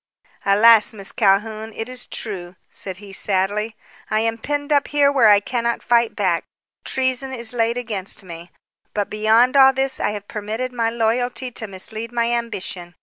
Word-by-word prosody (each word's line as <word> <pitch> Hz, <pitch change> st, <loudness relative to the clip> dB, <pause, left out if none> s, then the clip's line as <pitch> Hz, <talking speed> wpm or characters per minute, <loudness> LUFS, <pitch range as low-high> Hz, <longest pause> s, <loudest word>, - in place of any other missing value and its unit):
"Alas, 220 Hz, +2 st, +6 dB
Miss 195 Hz, -2 st, -1 dB
Calhoun, 215 Hz, +1 st, +1 dB
it 225 Hz, -, -4 dB
is 255 Hz, -1 st, -6 dB
true," 185 Hz, -5 st, -6 dB, 0.2 s
said 190 Hz, -2 st, -6 dB
he 200 Hz, 0 st, -12 dB
sadly, 205 Hz, +3 st, 0 dB, 0.3 s
"I 215 Hz, 0 st, +1 dB
am 225 Hz, 0 st, -1 dB
penned 290 Hz, +4 st, -2 dB
up 285 Hz, -1 st, +2 dB
here 285 Hz, -1 st, +3 dB
where 260 Hz, -5 st, +4 dB
I 205 Hz, -1 st, +7 dB
cannot 235 Hz, +2 st, -2 dB
fight 235 Hz, -1 st, +2 dB
back. 185 Hz, -5 st, 0 dB, 0.4 s
Treason 265 Hz, 0 st, -1 dB
is 235 Hz, -1 st, -3 dB
laid 230 Hz, 0 st, 0 dB
against 210 Hz, -6 st, -3 dB
me. 170 Hz, -1 st, -10 dB, 0.5 s
But, 205 Hz, -1 st, -1 dB
beyond 220 Hz, +5 st, +3 dB
all 270 Hz, -1 st, +7 dB
this, 265 Hz, 0 st, -1 dB
I -, -, 0 dB
have 205 Hz, -1 st, -6 dB
permitted 220 Hz, +4 st, -4 dB
my 230 Hz, -2 st, 0 dB
loyalty 245 Hz, +2 st, -1 dB
to 225 Hz, -2 st, -5 dB
mislead 215 Hz, +4 st, -5 dB
my 235 Hz, -1 st, 0 dB
ambition. 190 Hz, -7 st, -4 dB
225 Hz, 170 wpm, -21 LUFS, 205-245 Hz, 0.5 s, I